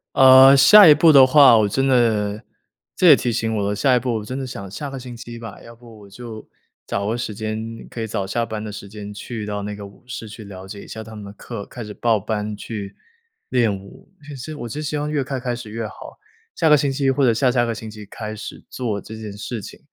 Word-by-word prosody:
呃， 130 +1 +8
下 180 +8 +9
一 150 - +10
步 155 +2 +5
的 135 -2 +8
话， 130 -3 +7
我 110 -1 +3
真 135 +6 0
的 110 -5 +1 0.5
这 180 - +3
也 155 - +10
提 125 - -2
醒 110 -1 -1
我 100 - -1
的 100 - -1
了 105 - -1
下 130 +4 +3
一 125 - +3
步 125 0 -2
我 105 - -6
真 130 +5 -6
的 135 - -4
想 100 -6 -8
下 140 +9 -6
个 135 - -6
星 125 -1 -9
期 120 0 -9
吧， 115 -3 -9
要 115 - -13
不 115 -2 -16
我 100 - -14
就 110 +1 -10 0.4
找 100 0 -3
个 115 +3 -1
时 115 -3 -4
间， 110 +1 -4 0.3
可 115 - -9
以 115 - -2
早 100 -3 -3
下 115 +4 -1
班 110 -2 -6
的 105 - -6
时 100 0 -9
间 105 0 -9
去 110 +2 -7
到 105 -1 -4
那 105 0 -5
个 100 -1 -9
舞 100 - -19
室 115 -3 -8
去 110 +1 -10
了 95 -2 -10
解 100 +1 -9
一 - - -14
下 110 - -7
他 110 0 -11
们 105 -1 -9
的 100 - -10
课， 105 -1 -8
开 120 - -9
始 105 -1 -9
报 115 -3 +1
班 105 +1 -3
去 100 -2 -7 0.5
练 115 -5 +1
舞。 100 0 -14 0.2
其 145 - -7
实 135 +4 -7
我 120 -5 -7
就 145 - -6
希 150 0 -3
望 150 0 -3
越 150 -2 -1
快 130 0 -4
开 125 -1 -3
始 120 -3 -9
越 115 0 -4
好， - - -12 0.3
下 160 - +1
个 150 - +7
星 140 -1 0
期 135 0 0
或 135 +1 +2
者 120 - +4
下 125 +3 +2
下 120 -1 +2
个 115 - -2
星 110 0 -8
期 105 -1 -10
开 105 +1 -7
始 105 - -9
做 110 -6 -3
这 110 - -10
件 110 -2 -8
事 110 +1 -6
情。 - - -11
115 Hz, 290 characters per minute, -21 LUFS, 105-130 Hz, 0.5 s, 一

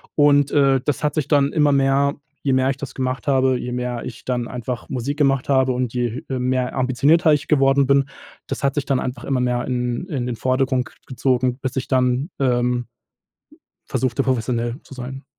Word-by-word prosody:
und, 145 -1 +4
äh, 135 -2 +3
das 145 - -1
hat 150 - +1
sich 155 -3 -1
dann 145 -1 +2
immer 150 -2 +3
mehr 140 +1 +2 0.3
je 135 - +2
mehr 130 0 +2
ich 135 - 0
das 140 -2 -7
gemacht 130 0 -2
habe, 130 -2 +3
je 125 0 -5
mehr 125 -1 -3
ich 115 - -9
dann 120 -2 -1
einfach 125 0 -5
Musik 135 +2 -3
gemacht 135 -3 +2
habe 130 -1 +3
und 125 -2 -2
je 120 -1 -2
he 130 -1 -3
mehr 125 0 -1
ambitionierter 135 +6 +3
ich 145 -1 -1
geworden 135 -2 +4
bin, 140 0 +4 0.4
das 135 - -5
hat 140 - +1
sich 145 - 0
dann 135 -2 +1
einfach 125 +1 -4
immer 135 -2 0
mehr 125 -1 0
in 125 +4 -2
in 140 -9 -3
den 120 - -2
Vordergrund 130 0 +1
k - - -18
gezogen, 130 -1 0
bis 130 - -4
ich 130 - -2
dann, 130 +3 +1
ähm, 125 -2 +1 1.0
versuchte 130 +1 0
professionell 120 -1 -1
zu - - -13
sein. 130 +1 -7
130 Hz, 200 wpm, -21 LUFS, 125-140 Hz, 1.0 s, und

